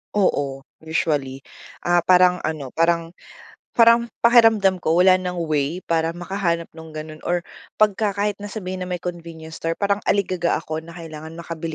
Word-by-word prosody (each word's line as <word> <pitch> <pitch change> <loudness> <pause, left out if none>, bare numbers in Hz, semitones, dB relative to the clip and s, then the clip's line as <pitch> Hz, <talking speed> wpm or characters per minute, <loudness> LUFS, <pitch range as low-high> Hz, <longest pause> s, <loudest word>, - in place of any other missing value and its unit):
Oo, 140 -9 0 0.2
usually. 145 -4 -1 0.4
Ah, 175 -1 +2
parang 180 -1 +4
ano, 155 -3 -3
parang 170 +1 +1 0.6
parang 235 0 +6 0.2
pakiramdam 225 -5 +5
ko 160 - +2
wala 185 0 +7
ng 180 -1 -4 0.2
way 150 +3 0
para 165 0 +1
makahanap 175 -2 -2
nung 160 -1 -11
ganun, 155 0 -7
or 175 0 0 0.4
pagka 210 0 +3
kahit 205 +1 -1
na 205 - -7
sabihin 185 -3 -5
na - - -4
may 180 - -2
convenience 165 -2 -7
store, 165 0 -2
parang 200 0 +1
aligaga 185 -3 +1
ako 155 0 -5
na 165 0 -12
kailangan 160 -1 -9
makabili 165 -1 -5
170 Hz, 160 wpm, -22 LUFS, 160-190 Hz, 0.6 s, wala